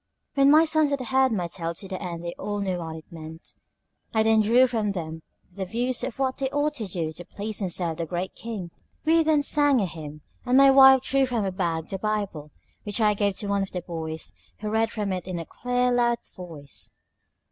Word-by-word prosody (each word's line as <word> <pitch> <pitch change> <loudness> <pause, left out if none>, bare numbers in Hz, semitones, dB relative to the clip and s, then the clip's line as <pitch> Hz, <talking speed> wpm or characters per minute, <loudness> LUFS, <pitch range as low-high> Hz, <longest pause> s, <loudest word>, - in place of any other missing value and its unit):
When 275 0 +5
my 310 +3 +7
sons 315 -2 +3
had 280 -1 -1
heard 260 +1 +2
my 185 -5 0
tale 170 -1 -4
to 195 - -4
the 185 -1 -5
end 175 -2 -5
they 170 - -3
all 205 0 -3
knew 190 -3 -1
what 160 -1 -5
it 160 - -10
meant; 160 0 -9 0.6
I 220 - +4
then 220 0 +4
drew 235 +5 +5
from 220 -5 -1
them 160 -3 -5 0.3
their 190 +1 -5
views 245 +5 0
of 245 - -4
what 265 -1 0
they 270 -1 -1
ought 290 +2 0
to 220 -4 -3
do 170 -4 -3
to 165 +3 -10
please 210 +4 -4
and 185 -3 -1
serve 170 -2 -1
the 165 -1 -3
Great 180 +3 -3
King. 210 -7 -6 0.3
We 330 +1 +5
then 310 -2 +3
sang 290 -3 +3
a 200 - +1
hymn; 155 -3 -8 0.2
and 255 +1 +3
my 275 0 +8
wife 265 -1 +8
drew 270 0 +2
from 240 -4 -1
her 195 - -1
bag 170 -3 -2
the 195 - -4
BIBLE, 200 -8 -2 0.3
which 205 +2 -3
I 210 -1 +4
gave 200 -2 0
to 205 - -3
one 200 0 +1
of 195 - -2
the 180 -2 -3
boys, 160 -2 -5 0.3
who 210 -1 -3
read 225 +1 +2
from 210 -4 -2
it 180 -1 -4
in 185 -2 -3
a 165 - -5
clear, 250 +4 0
loud 240 -1 +2 0.2
voice. 160 -6 -6
205 Hz, 230 wpm, -25 LUFS, 175-250 Hz, 0.6 s, my